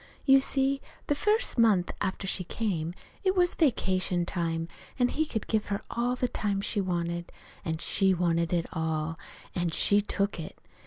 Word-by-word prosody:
"You 270 Hz, -1 st, +7 dB
see, 270 Hz, 0 st, +1 dB, 0.2 s
the -, -, +2 dB
first 420 Hz, -, +1 dB
month 205 Hz, -6 st, +4 dB
after 195 Hz, 0 st, -2 dB
she 185 Hz, -1 st, 0 dB
came, 175 Hz, -4 st, -2 dB, 0.3 s
it 380 Hz, 0 st, +2 dB
was 355 Hz, -1 st, +3 dB
vacation 185 Hz, -, +1 dB
time, 165 Hz, -2 st, -1 dB, 0.3 s
an' 245 Hz, -1 st, +3 dB
he 315 Hz, +1 st, 0 dB
could 220 Hz, -7 st, -3 dB
give 220 Hz, -1 st, 0 dB
her 200 Hz, -1 st, -1 dB
all 245 Hz, +1 st, 0 dB
the 250 Hz, -, 0 dB
time 205 Hz, -4 st, -1 dB
she 205 Hz, +1 st, -1 dB
wanted. 170 Hz, -2 st, -2 dB, 0.3 s
An' 160 Hz, -1 st, -2 dB
she 190 Hz, +3 st, +2 dB
wanted 170 Hz, -1 st, +1 dB
it 170 Hz, -2 st, +1 dB
all. 160 Hz, 0 st, -1 dB, 0.4 s
An' 175 Hz, -1 st, 0 dB
she 205 Hz, +5 st, +3 dB
took 200 Hz, -2 st, -1 dB
it. 160 Hz, -, -7 dB
195 Hz, 170 wpm, -29 LUFS, 170-245 Hz, 0.4 s, You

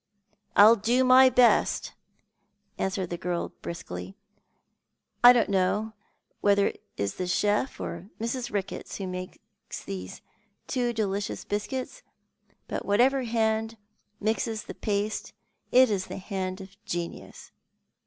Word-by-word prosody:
" 210 Hz, -, -42 dB
I'll 215 Hz, +3 st, +8 dB
do 235 Hz, +5 st, +2 dB
my 255 Hz, +1 st, +7 dB
best," 250 Hz, -1 st, +3 dB, 0.9 s
answered 190 Hz, -2 st, -2 dB
the 175 Hz, -, -4 dB
girl 175 Hz, -1 st, -2 dB
briskly. 170 Hz, +3 st, -7 dB, 0.6 s
" -, -, -50 dB
T 245 Hz, -, +12 dB
don't 240 Hz, -2 st, +3 dB
know 200 Hz, +3 st, 0 dB, 0.5 s
whether 200 Hz, 0 st, +3 dB
it -, -, -13 dB
is 100 Hz, -1 st, -2 dB
the 180 Hz, -, -2 dB
chef 210 Hz, +7 st, 0 dB
or 170 Hz, +4 st, -6 dB
Mrs. 240 Hz, +2 st, -3 dB
Ricketts 200 Hz, 0 st, -4 dB
who 195 Hz, -, -4 dB
makes 185 Hz, 0 st, -6 dB, 0.5 s
there 95 Hz, -1 st, -5 dB, 0.6 s
too 245 Hz, -2 st, 0 dB
delicious 205 Hz, -3 st, -2 dB
biscuits, 255 Hz, -, -4 dB, 0.7 s
but -, -, -4 dB
whatsoever 250 Hz, +6 st, +3 dB
hand 225 Hz, -1 st, 0 dB, 0.4 s
mixes 220 Hz, +1 st, -1 dB
the -, -, -8 dB
paste 210 Hz, 0 st, -2 dB, 0.4 s
it 255 Hz, -2 st, +6 dB
is 190 Hz, -2 st, -1 dB
the -, -, -6 dB
hand 190 Hz, -1 st, -4 dB
of 195 Hz, +2 st, -14 dB
genius. 170 Hz, 0 st, -6 dB
210 Hz, 130 wpm, -27 LUFS, 190-235 Hz, 0.9 s, T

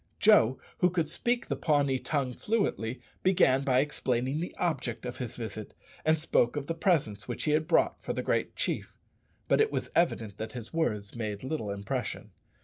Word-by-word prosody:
Joe, 170 Hz, -, +5 dB, 0.2 s
who 180 Hz, -, +5 dB
could 170 Hz, -3 st, -1 dB
speak 240 Hz, -1 st, 0 dB
the -, -, -2 dB
Pawnee 140 Hz, -4 st, +2 dB
tongue 130 Hz, 0 st, -1 dB
fluently, 130 Hz, -, -1 dB, 0.2 s
began 140 Hz, -8 st, +4 dB
by 130 Hz, -1 st, +4 dB
explaining 135 Hz, -1 st, -1 dB
the 175 Hz, -, -4 dB
object 125 Hz, -9 st, -1 dB
of 125 Hz, -, -5 dB
his 125 Hz, -3 st, -4 dB
visit, 110 Hz, -2 st, -6 dB, 0.3 s
and 155 Hz, 0 st, +4 dB
spoke 150 Hz, -5 st, +2 dB
of 145 Hz, -1 st, -2 dB
the 165 Hz, -, -2 dB
presents 160 Hz, -, +1 dB
which 120 Hz, -, -3 dB
he 150 Hz, -, +1 dB
had 155 Hz, +1 st, +2 dB
brought 175 Hz, -, +2 dB
for -, -, -3 dB
the -, -, -2 dB
great -, -, 0 dB
chief; -, -, -2 dB, 0.5 s
but -, -, +4 dB
it 440 Hz, -, +2 dB
was -, -, -2 dB
evident 115 Hz, -, +1 dB
that 110 Hz, -, -5 dB
his 120 Hz, -2 st, -8 dB
words 105 Hz, -11 st, -1 dB
made 105 Hz, -2 st, -4 dB
little 130 Hz, -6 st, -3 dB
impression. 100 Hz, -1 st, -4 dB
135 Hz, 185 wpm, -29 LUFS, 115-160 Hz, 0.5 s, Joe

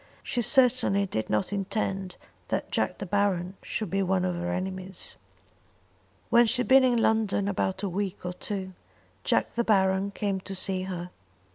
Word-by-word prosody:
She 245 Hz, -, -1 dB
certainly 245 Hz, -5 st, +3 dB
did 110 Hz, -, -3 dB
not 105 Hz, -, 0 dB
intend 195 Hz, -1 st, -2 dB, 0.3 s
that -, -, -2 dB
Jack -, -, 0 dB
De -, -, -5 dB
Baron 190 Hz, -1 st, 0 dB
should 215 Hz, -5 st, -4 dB
be 195 Hz, +1 st, +1 dB
one 190 Hz, -1 st, +1 dB
of 180 Hz, -, 0 dB
her 175 Hz, 0 st, -2 dB
enemies. 185 Hz, 0 st, -5 dB, 1.2 s
When 235 Hz, 0 st, +6 dB
she 250 Hz, +3 st, +1 dB
had -, -, -2 dB
been 265 Hz, 0 st, +7 dB
in 245 Hz, -3 st, +3 dB
London 215 Hz, -3 st, +2 dB
about 190 Hz, 0 st, -1 dB
a -, -, +1 dB
week 190 Hz, 0 st, -3 dB
or 180 Hz, -, -2 dB
two 190 Hz, 0 st, -4 dB, 0.5 s
Jack -, -, +1 dB
De 235 Hz, -, +1 dB
Baron 190 Hz, -2 st, +2 dB
came 200 Hz, -1 st, -2 dB
to 195 Hz, +1 st, -6 dB
see 190 Hz, 0 st, +1 dB
her. 180 Hz, -1 st, -5 dB
195 Hz, 170 wpm, -27 LUFS, 185-205 Hz, 1.2 s, been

